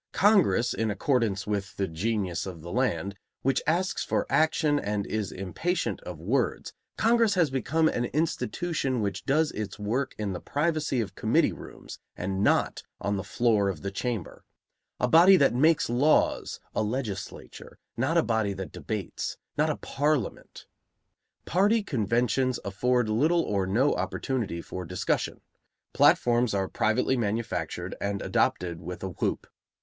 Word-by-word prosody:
Congress, 185 - +4
in 110 -1 -1
accordance 105 -2 0
with 100 -2 -3
the 95 - 0
genius 95 +1 -2
of 85 -4 -8
the 85 - -7
land, 100 -5 0 0.3
which 135 0 +2
asks 180 +4 +1
for - - 0
action 155 -2 +3
and 105 -3 -2
is 110 -3 -3
impatient 95 - -2
of - - -7
words, - - -1 0.2
Congress 230 -2 +3
has 165 -6 +2
become 155 +5 +1
an 120 -5 0
institution 155 -2 -1
which 100 - -3
does 155 +3 +2
its 105 -2 -5
work 115 +7 -2
in 105 -2 -2
the 90 - -4
privacy 150 - 0
of 100 -3 -5
committee - - +2
rooms - - -11 0.2
and 95 +2 -2
not - - +2 0.2
on 100 0 -1
the 95 - -3
floor 105 0 +2
of 95 - -5
the 100 - -3
Chamber; 110 -2 -4 0.6
a 125 - +2
body 175 +7 +7
that 140 -6 +4
makes 155 +6 +3
laws, 130 +6 +2
a - - 0
legislature; 110 -3 -5 0.2
not 130 +9 +1
a 165 - +4
body 110 -3 0
that 95 -1 -6
debates, 105 -5 -4 0.2
not - - +2
a - - 0
parliament. 145 -5 -2 0.8
Party 205 +5 +3
conventions 125 - 0
afford 120 +4 +1
little 155 +11 +2
or 100 -2 -1
no 125 +9 +2
opportunity 110 -11 -2
for 90 - -6
discussion; 90 +1 -2 0.5
platforms 120 -2 +4
are 95 -1 0
privately 110 +6 +1
manufactured 115 -1 -2
and 100 -1 -2
adopted 85 -2 0
with 90 +3 -7
a 95 - -2
whoop. 90 - -2
115 Hz, 150 wpm, -27 LUFS, 100-145 Hz, 0.8 s, body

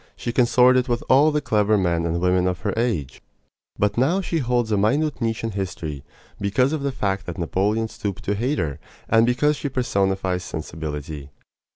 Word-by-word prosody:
She 120 - -4
consorted 125 +1 +4
with 120 -1 -1
all 140 +4 +6
the 150 -1 0
clever 105 -2 +2
men 85 -3 +1
and 85 +1 -1
women 90 0 +2
of 90 -3 -2
her - - -1
age. 110 - -2 0.6
But 105 +3 +1
now 160 +9 +2
she 175 -3 -1
holds 120 -3 0
a - - +3
minute 140 +8 +1
niche 115 -1 -1
in 115 - -2
history 85 -8 -5 0.4
because 125 +8 +1
of 155 - -2
the 140 0 -1
fact 95 -5 -2
that 90 - -5
Napoleon 100 +6 0
stooped 100 -3 -5
to 100 - 0
hate 125 +8 -1
her, 75 -3 -2 0.3
and 115 +1 +4
because 145 +5 +2
she 145 - -3
personifies 95 -7 0
sensibility. 75 -2 -6
105 Hz, 185 wpm, -23 LUFS, 90-125 Hz, 0.6 s, all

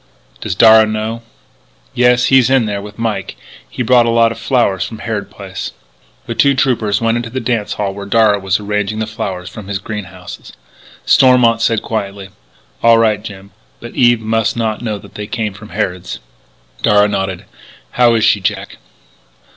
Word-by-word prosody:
"Does - - -4
Darragh 110 +1 +6
know?" 110 +2 -3 0.7
"Yes. 125 0 +3
He's 130 -2 +5
in 130 -3 +3
there 100 -1 -3
with 105 +1 -11
Mike. 115 -2 -3 0.3
He 125 - -4
brought 120 0 +4
a - - +1
lot 115 0 +3
of 115 - -7
flowers 120 -8 +1
from 110 - -7
Harrod 105 -3 -4
Place." 95 -2 -7 0.5
The - - -4
two 135 +5 +3
troopers 115 -6 +1
went 115 0 +1
into 120 -1 -4
the 130 +3 -4
dance 115 -5 -2
hall 100 -2 -3
where 100 0 -8
Darragh 105 -1 +3
was 95 0 0
arranging 105 0 -2
the 110 - -1
flowers 100 -5 -5
from 95 +2 -9
his 100 -1 -2
greenhouses. 105 -1 -8 0.5
Stormont 125 -3 +4
said 115 -2 +1
quietly: 100 -3 -4 0.5
"All 115 0 +6
right, 110 -2 +2
Jim, 100 -2 -10 0.3
but 120 - -10
Eve 120 -2 +3
must 115 +1 0
not 110 -1 -2
know 110 -3 -3
that - - -15
they 105 0 -6
came 110 -2 -3
from 105 +2 -12
Harrod's." 90 -2 -3 0.6
Darragh 105 0 +3
nodded: 95 -2 -3 0.5
"How 120 -2 +3
is 110 - +1
she, 110 -3 +3
Jack?" 105 +2 -3
110 Hz, 175 wpm, -15 LUFS, 100-115 Hz, 0.7 s, Darragh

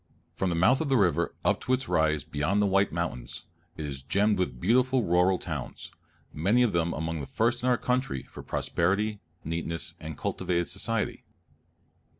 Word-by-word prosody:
From 95 - -1
the 85 - 0
mouth 110 - +4
of 155 - -1
the 135 - +4
river 95 -6 +2
up - - +2
to 130 - 0
its 130 +1 0
rise 80 -4 +2
beyond 80 +11 0
the 105 - +3
White 100 0 +2
Mountains, 85 -8 -4 0.3
it 80 - -4
is 70 -2 -4
gemmed 100 +8 +2
with 90 - -1
beautiful 125 +6 +3
rural 90 +1 +3
towns, - - -6 0.4
many 100 +11 +3
of 115 - +1
them 85 0 +1
among 80 0 -3
the 70 - -5
first 120 +2 +1
in 125 - +1
our 125 - +4
country 125 - -1
for - - -11
prosperity, 100 +5 0 0.2
neatness, 85 +1 -3
and 80 -2 -7
cultivated 85 -1 -1
society. - - -2
90 Hz, 175 wpm, -28 LUFS, 80-115 Hz, 0.4 s, mouth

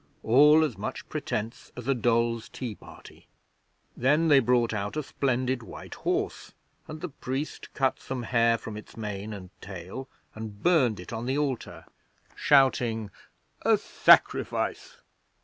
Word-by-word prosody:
All 150 +6 +6
as 155 - -2
much - - -5
pretence 110 +2 -4
as 125 0 -7
a 135 - +4
dolls' 115 -1 +1
tea 120 -3 -5
party. - - -15 0.7
Then 150 +6 +3
they 145 -2 +7
brought 120 -2 +2
out 105 +5 -3
a 155 - -1
splendid 130 -2 -1
white 115 - -10
horse, - - -2 0.3
and 155 0 -8
the 180 - -4
priest 135 +1 -5
cut 135 -1 +1
some 130 -2 -5
hair 115 0 +3
from 110 -1 -8
its 105 - -12
mane 105 -1 -5
and 95 -3 -8
tail 95 +7 -8 0.2
and 110 -2 -8
burned 135 - +3
it 90 - -9
on 115 +2 -4
the 135 +2 0
altar, 135 -5 -3 0.5
shouting, 120 -6 +3 0.5
"A - - +4
sacrifice!" - - +2
120 Hz, 145 wpm, -27 LUFS, 110-135 Hz, 0.7 s, they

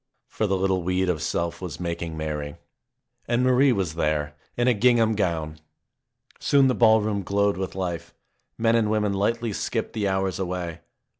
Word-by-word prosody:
For 110 - -2
the 95 -1 +1
little 95 -1 +1
weed 90 +1 0
of 80 -4 -1
self 85 +3 -2
was 90 -4 -6
making 85 -2 -4
merry. 75 -2 -4 0.7
And 120 +1 +1
Marie 130 +2 +4
was 95 -9 -1
there 75 -2 -1 0.2
in 120 +1 +2
a 125 - +5
gingham 115 0 +3
gown! 80 -6 -2 0.8
Soon 140 -2 +4
the 130 - +2
ballroom 110 -3 +3
glowed 100 +2 +1
with 95 -1 -4
life. 85 -3 -4 0.5
Men 115 0 +3
and 110 -2 +2
women 105 -2 +1
lightly 115 +3 0
skipped - - -3
the 105 -2 -1
hours 95 0 -1
away. 90 -3 -3
95 Hz, 165 wpm, -25 LUFS, 85-110 Hz, 0.8 s, a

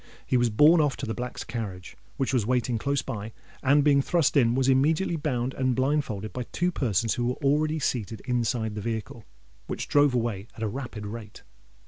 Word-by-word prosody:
He - - 0
was 120 -1 +3
borne 150 +10 +6
off 145 -4 0
to - - -4
the 110 - -3
Black's 125 +1 -5
carriage, 100 -6 -6 0.2
which 135 0 -1
was 125 -4 +2
waiting 120 0 0
close 140 +3 0
by; 105 +1 -5 0.3
and, 140 +2 +4
being 140 -1 +4
thrust 165 +1 +1
in, 120 -4 +4
was 130 0 +1
immediately 155 +7 +2
bound 130 -5 -1
and 130 -1 0
blindfolded 130 -6 -1
by 125 -1 -4
two 180 +1 0
persons 115 - 0
who 120 - -1
were 125 - 0
already 155 +3 +2
seated 115 -7 -2
inside 120 -3 0
the 105 - -5
vehicle, 115 0 -5 0.4
which - - -4
drove 145 -3 +4
away 115 -4 -2
at 115 - -4
a - - +1
rapid 120 -2 -6
rate. 105 0 -8
125 Hz, 195 wpm, -27 LUFS, 110-140 Hz, 0.4 s, borne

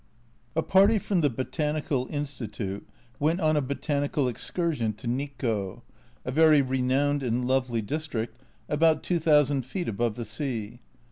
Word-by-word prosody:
A 160 - +2
party 200 +4 +5
from 190 -2 0
the 145 - +3
Botanical 140 +1 -2
Institute 115 -9 -4 0.3
went 160 +5 +2
on 155 -3 +2
a 150 - +3
botanical 140 0 -1
excursion 125 -2 -1
to 110 +4 -13
Nikko, 120 -6 -2 0.4
a 130 - -2
very 155 +1 +6
renowned 130 +2 +1
and 125 -1 0
lovely 125 -3 +1
district 120 -3 -3 0.3
about 155 +1 +3
2000 150 -5 +3
feet 175 +9 -4
above 115 +1 -1
the 120 -1 -5
sea. 115 -1 -4
135 Hz, 135 wpm, -27 LUFS, 120-155 Hz, 0.4 s, very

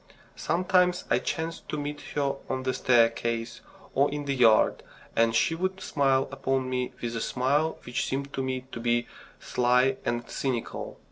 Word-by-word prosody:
Sometimes 180 +1 +2
I - - +4
chanced 165 0 -4
to 155 - -2
meet 145 0 -4
her 140 -2 0
on 130 0 -2
the 130 0 0
staircase 115 -1 +1 0.3
or 140 +2 +3
in 145 0 -4
the 140 - 0
yard, 115 -4 +4 0.3
and 115 0 +3
she 165 - +3
would 185 +3 -2
smile 135 -6 +1
upon 135 -1 -1
me 125 -1 -1
with 120 -1 -2
a 115 - -2
smile 145 +8 +1
which 120 - -2
seemed 140 +1 -3
to - - -2
me 130 -1 -3
to - - -6
be 120 0 +1 0.3
sly 125 +2 +2
and 120 0 -2
cynical. 125 -4 -3
130 Hz, 165 wpm, -27 LUFS, 120-145 Hz, 0.3 s, I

